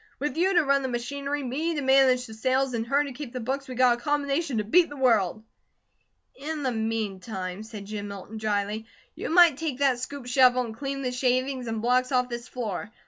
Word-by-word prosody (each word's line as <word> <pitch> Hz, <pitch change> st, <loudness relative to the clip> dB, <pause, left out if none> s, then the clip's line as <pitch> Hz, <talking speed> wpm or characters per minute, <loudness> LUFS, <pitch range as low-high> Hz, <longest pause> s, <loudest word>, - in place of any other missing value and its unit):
With 295 Hz, +2 st, -3 dB
you 365 Hz, +3 st, +2 dB
to 345 Hz, -, +5 dB
run 275 Hz, -1 st, +2 dB
the 265 Hz, -, -2 dB
machinery, 280 Hz, +4 st, -3 dB
me 305 Hz, +7 st, -2 dB
to 290 Hz, -, -1 dB
manage 265 Hz, -1 st, +4 dB
the 220 Hz, -, -10 dB
sales, 255 Hz, +4 st, 0 dB
and 230 Hz, -1 st, -2 dB
her 280 Hz, +3 st, +3 dB
to 285 Hz, -, -6 dB
keep 270 Hz, -2 st, -8 dB
the 255 Hz, -, -3 dB
books, 270 Hz, +4 st, -3 dB
we 255 Hz, -, -6 dB
got 245 Hz, -1 st, +4 dB
a -, -, -17 dB
combination 285 Hz, -1 st, 0 dB
to 215 Hz, -, +1 dB
beat 335 Hz, +11 st, +4 dB
the 290 Hz, -, -9 dB
world." 220 Hz, -6 st, +2 dB, 0.9 s
"In 300 Hz, +2 st, -5 dB
the 260 Hz, -, +1 dB
meantime," 210 Hz, -4 st, -3 dB
said 215 Hz, -2 st, -9 dB
Jim 205 Hz, 0 st, -5 dB
Milton 200 Hz, +2 st, -8 dB
dryly, 210 Hz, +1 st, -2 dB, 0.3 s
"you -, -, -5 dB
might 335 Hz, -4 st, +6 dB
take 315 Hz, -6 st, -2 dB
that 270 Hz, -3 st, +2 dB
scoop 260 Hz, +1 st, -6 dB
shovel 250 Hz, 0 st, +4 dB
and 220 Hz, -1 st, -8 dB
clean 275 Hz, +2 st, -4 dB
the 250 Hz, -, -1 dB
shavings 255 Hz, 0 st, 0 dB
and 225 Hz, -1 st, -3 dB
blocks 255 Hz, +2 st, +2 dB
off 250 Hz, -1 st, +2 dB
this 240 Hz, 0 st, -6 dB
floor. 210 Hz, -4 st, -5 dB
255 Hz, 215 wpm, -26 LUFS, 225-280 Hz, 0.9 s, might